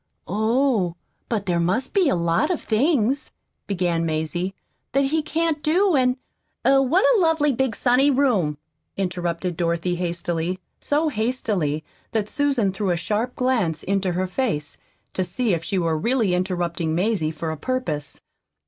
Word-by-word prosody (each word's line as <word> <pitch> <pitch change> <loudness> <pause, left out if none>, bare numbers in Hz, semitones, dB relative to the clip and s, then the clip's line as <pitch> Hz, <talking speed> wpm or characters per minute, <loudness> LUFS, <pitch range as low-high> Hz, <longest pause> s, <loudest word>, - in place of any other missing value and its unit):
"Oh, 220 -2 +1 0.3
but 215 -4 -1
there 175 -2 +1
must 190 +10 0
be 375 -7 +4
a - - +2
lot 170 - +1
of 360 - 0
things," 260 +2 +1 0.4
began 175 -4 0
Mazie, 165 +4 -2 0.4
"that 275 +1 +3
he 310 +4 +1
can't 315 0 -1
do, 355 +4 +3
and 255 -1 +3 0.2
" - - -45
"Er 270 0 +6
what 330 - +3
a 415 - +3
lovely 320 -3 +3
big, 260 -3 0
sunny 255 +3 +3
room," 235 - +2 0.4
interrupted 175 -2 -2
Dorothy 170 +1 0
hastily, 175 0 -2 0.2
so 305 +2 +1
hastily 210 - -1 0.3
that 215 -2 -1
Susan 275 -9 +1
threw 195 0 -1
a 175 - +1
sharp 215 +8 -1
glance 245 -11 0
into 195 -2 0
her 185 +2 0
face 185 - -2 0.3
to 185 - 0
see 190 +4 0
if 165 -1 -1
she 195 +2 -1
were 165 -3 +1
really 230 -1 +1
interrupting 175 -3 -1
Mazie 185 -3 +1
for 160 0 -4
a - - -3
purpose. 155 - -3
200 Hz, 155 wpm, -23 LUFS, 170-265 Hz, 0.4 s, Er